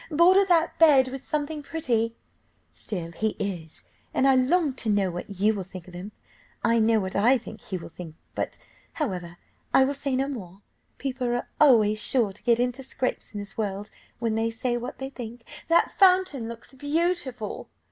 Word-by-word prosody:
['Border 355 +5 +6
that 340 -3 +2
bed 280 -5 +6
with 270 +1 -7
something 300 0 -2
pretty.'] 235 -7 -1 0.6
Still 175 -5 -3
he 215 +5 -1
is, 175 -6 -4 0.3
and 270 - +4
I 270 - +6
long 275 +4 +3
to 225 - -1
know 200 -3 +2
what 175 +3 -6
you 200 +2 +2
will 200 - -3
think 185 -1 -10
of 180 - -13
him; 185 +4 -7 0.5
I 230 0 +3
know 220 0 +4
what 190 -2 -3
I 240 +7 +5
think 220 -2 -10
he 190 - -4
will 170 - -9
think, 165 -2 -10 0.2
but, - - -3 0.4
however, 180 - -3 0.4
I 265 - +7
will 280 - -1
say 275 -1 -1
no 270 +1 +1
more; 200 -8 -8 0.3
people 260 -2 -3
are 240 0 -1
always 215 -7 +5
sure 225 -6 +2
to - - -12
get 235 -1 +3
into 250 +2 0
scrapes 255 -3 -3
in - - -3
this 205 +2 -8
world, 205 0 -3 0.3
when 230 -2 -1
they 225 +1 +1
say 240 +2 -2
what 240 +2 -5
they 265 0 -5
think. 240 -2 -8 0.2
['That 335 0 +4
fountain 365 - +3
looks 235 +3 -9
beautiful. 290 - -2
240 Hz, 190 wpm, -26 LUFS, 205-275 Hz, 0.6 s, I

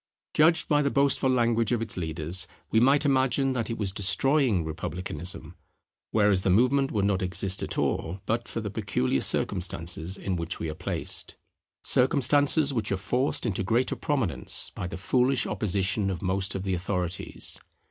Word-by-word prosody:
Judged 160 +1 +4
by 150 -1 +3
the 140 - +1
boastful 140 -1 +3
language 115 -3 +2
of 120 - +2
its 115 -2 -2
leaders, 85 +1 -2 0.2
we 110 - +4
might 140 +5 +4
imagine 135 0 +2
that 115 -4 -2
it 115 - -3
was 100 -3 -1
destroying 100 - +2
republicanism; 85 +1 -6 0.6
whereas 105 -3 +3
the 95 - 0
movement 130 +8 +3
would 100 -3 0
not 100 -1 +1
exist 95 +1 -2
at - - -3
all, 85 +5 -1
but 115 +1 -1
for 115 - -4
the 105 -2 -4
peculiar 100 - 0
circumstances 90 -1 -1
in 95 - -2
which 85 0 -2
we 80 - -3
are - - -5
placed; - - -4 0.5
circumstances 145 +3 +3
which 110 -5 -2
are 95 - +1
forced 125 +10 -1
into 100 -5 -1
greater 115 +6 +1
prominence 110 - +1
by 90 - -5
the 80 - -6
foolish 125 +6 +2
opposition 100 0 0
of 90 -3 -4
most 95 +1 -1
of 95 - -3
the 95 -1 -1
authorities. 90 -1 -3
100 Hz, 170 wpm, -27 LUFS, 90-125 Hz, 0.6 s, Judged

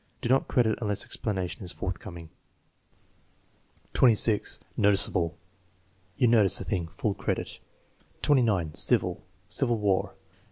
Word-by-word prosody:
Do 120 - -3
not 135 +1 +2
credit 115 -3 +1
unless 105 -3 -2
explanation 95 0 -4
is 90 - -5
forthcoming. 85 -3 -7 1.6
26. 110 -3 +3 0.2
Noticeable. 95 -5 +3 0.8
"You 125 - +3
notice 110 -5 +4
a - - -5
thing." 90 -5 -3
(Full 100 +5 -3
credit.) - - -4 0.6
29. 110 - +2
Civil - - +2 0.2
"Civil 120 -1 -1
War." 100 -3 -1
105 Hz, 110 wpm, -27 LUFS, 90-115 Hz, 1.6 s, notice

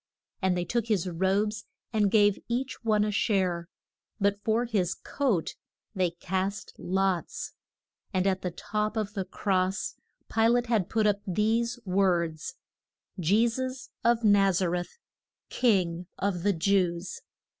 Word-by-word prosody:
And 185 -2 +2
they 175 - -1
took 235 +1 -1
his 200 -5 +1
robes 195 +5 0 0.3
and 210 -2 +3
gave 205 -1 +4
each 255 +2 -3
one 215 -2 +3
a 210 - 0
share; 185 -5 0 0.5
but 200 0 +1
for 230 +2 +2
his 190 -6 0
coat 240 - -1 0.4
they 185 -3 +1
cast 190 +4 -3
lots. 190 -2 -1 0.6
And 185 0 +1
at 190 -1 +1
the 180 - -1
top 210 +5 -2
of 210 -2 -2
the 195 -3 -2
cross 190 0 0 0.3
Pi 225 0 +3
late 240 +1 +3
had 225 -6 +1
put 220 -1 +1
up 205 -1 +2
these 225 +5 +1
words: 175 -5 +1 0.6
JE 205 +8 +4
SUS 255 +2 -4
OF 235 0 +3
NAZ 195 -3 +4
A 180 - +2
RETH, 175 - -3 0.5
KING 180 -7 +1
OF 190 -3 -1
THE 200 +2 +2
JEWS. 175 0 0
200 Hz, 145 wpm, -28 LUFS, 185-220 Hz, 0.6 s, gave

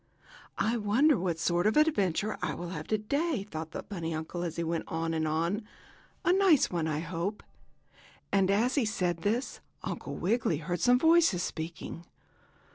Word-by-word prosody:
"I 230 +2 +1
wonder 240 +8 +4
what 175 -4 -1
sort 175 +3 +1
of 220 - +2
an 305 +1 +6
adventure 205 - 0
I 155 -5 -1
will 175 +3 -6
have 185 - -6
today?" 245 - 0
thought 160 -4 -5
the - - -6
bunny 165 -5 -4
uncle 160 +2 -4
as 170 -2 -3
he 170 - -2
went 165 0 -2
on 165 0 -2
and 160 -1 0
on. 170 +7 0 0.6
"A 355 - +5
nice 375 -7 +4
one, 170 -3 -1
I 155 -1 -1
hope." 175 +5 -3 0.9
And, 195 -1 +3
as 225 +6 +2
he 280 - +2
said 180 -5 0
this, 215 +9 -1 0.2
Uncle - - -5
Wiggily 200 -4 +1
heard 170 +3 -3
some 245 +6 +5
voices 320 - +4
speaking. 170 +1 -6
185 Hz, 175 wpm, -30 LUFS, 165-230 Hz, 0.9 s, an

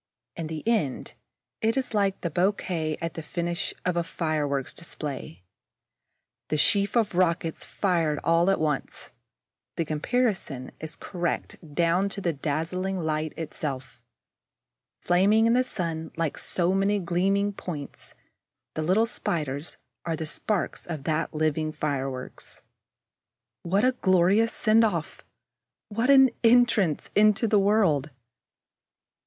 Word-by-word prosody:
In 165 -2 -4
the 160 +5 -6
end, 210 - 0 0.5
it 225 +3 +1
is 260 -3 -1
like 200 -2 +1
the 170 - -2
bouquet 175 -3 0
at 165 0 -3
the 165 - -6
finish 170 +2 -3
of 180 -1 +1
a 170 - +1
fireworks 150 -4 -2
display, 140 - -6 1.0
the 155 - 0
sheaf 200 +6 +3
of 215 -4 +1
rockets 170 -2 +1
fired 165 -6 0
all 165 +2 +3
at 195 - +2
once. 150 -3 -2 0.6
The 165 - -1
comparison 155 - -1
is 160 0 -6
correct 175 -2 -3 0.2
down 175 +4 +2
to 200 - -5
the 175 -4 0
dazzling 170 +6 -2
light 155 -1 -1
itself. 145 -4 -5 1.0
Flaming 200 +5 +4
in 230 - +4
the 250 +1 +4
sun 165 -9 -3
like 165 -3 -1
so 180 0 +1
many 195 +2 +2
gleaming 195 +3 +1
points, 155 -7 -7 0.6
the 155 - -3
little 185 +8 +3
Spiders 150 -8 -3 0.3
are 165 -1 -1
the 160 - -4
sparks 190 +5 -2
of 160 -5 -5
that 155 +2 -1
living 155 0 0
fireworks. 135 -4 -4 1.0
What 195 +6 +1
a 255 - +5
glorious 195 0 +3
send 225 +1 +4
off! 220 - -2 0.7
What 230 +5 0
an 265 -2 +7
entrance 230 -8 +3
into 215 +2 +4
the 210 -1 +4
world! 195 -8 +2
175 Hz, 130 wpm, -26 LUFS, 155-200 Hz, 1.0 s, an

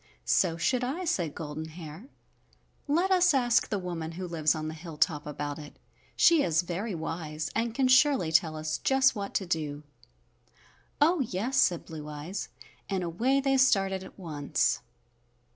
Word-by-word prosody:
"So 170 -3 +2
should 250 +9 +1
I," 300 +9 -3
said 170 - -1
Golden 155 -1 -5
Hair. 160 +4 -10 0.8
"Let 345 +6 +2
us 360 -4 +5
ask 245 -3 +2
the 205 - -1
woman 170 -3 -5
who 180 +2 -5
lives 160 -3 +1
on 155 0 -4
the 155 - -4
hilltop 155 -2 -1
about 145 0 -4
it. 150 -1 -11 0.4
She 335 -3 +5
is 165 - +2
very 185 +4 -3
wise 160 -2 -4
and 230 0 -1
can 265 0 +2
surely 260 - +4
tell 160 -1 +3
us 155 0 -3
just 265 -1 +3
what 200 -1 -5
to 195 - 0
do." 150 -4 -3 1.2
"Oh, 330 +4 +4
yes," 235 +1 -1
said 175 -3 +3
Blue 155 -2 -8
Eyes, 150 +7 -6 0.4
and 190 -2 -1
away 235 +11 +1
they 270 0 +2
started 195 -7 +3
at - - -13
once. 155 -6 -1
175 Hz, 160 wpm, -28 LUFS, 155-250 Hz, 1.2 s, us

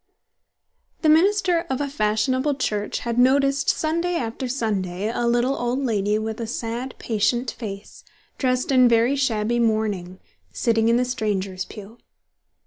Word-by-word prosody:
The 310 - +4
minister 365 +2 +4
of 265 - -1
a 290 - -1
fashionable 260 +3 0
church 210 -6 -2
had 235 0 -2
noticed 275 +2 +3
Sunday 335 +3 0
after 245 -2 -3
Sunday 210 -5 -2
a 240 - -1
little 240 +3 +2
old 245 +1 -1
lady 210 -6 0
with 220 +1 -4
a 230 - -3
sad, 235 +2 -4
patient 235 +3 0
face, 200 -3 -8 0.4
dressed 255 0 0
in 255 -2 +6
very 235 +4 +3
shabby 240 -3 0
mourning, 210 -5 -1 0.3
sitting 225 - +1
in 235 - +4
the 250 - +1
strangers' 200 -6 -2
pew. 210 +3 -11
235 Hz, 140 wpm, -23 LUFS, 215-265 Hz, 0.4 s, in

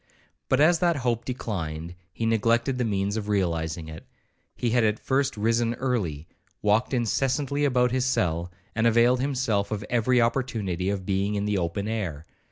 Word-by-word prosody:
But 130 - +3
as 165 +3 +5
that 175 -2 +2
hope 120 -2 0
declined, 85 -10 -4 0.2
he 115 - -3
neglected 115 +3 +1
the - - +2
means 100 -1 -1
of 105 -1 -4
realizing 85 -5 -1
it. 80 0 -9 0.5
He 120 - -1
had 120 0 +3
at 105 -1 +2
first 135 0 0
risen 115 +2 +1
early, 95 - -2 0.4
walked 105 +4 +2
incessantly 135 +4 0
about 125 -3 +2
his 130 0 +1
cell, 85 -7 0 0.2
and 110 +1 +2
availed 120 +2 +4
himself 125 -7 0
of 105 -1 -3
every 125 +1 +3
opportunity 115 -7 0
of 100 -2 -3
being 100 +2 0
in 100 0 -1
the 105 -2 0
open 90 +4 -2
air. 90 -9 -3
110 Hz, 170 wpm, -26 LUFS, 95-125 Hz, 0.5 s, as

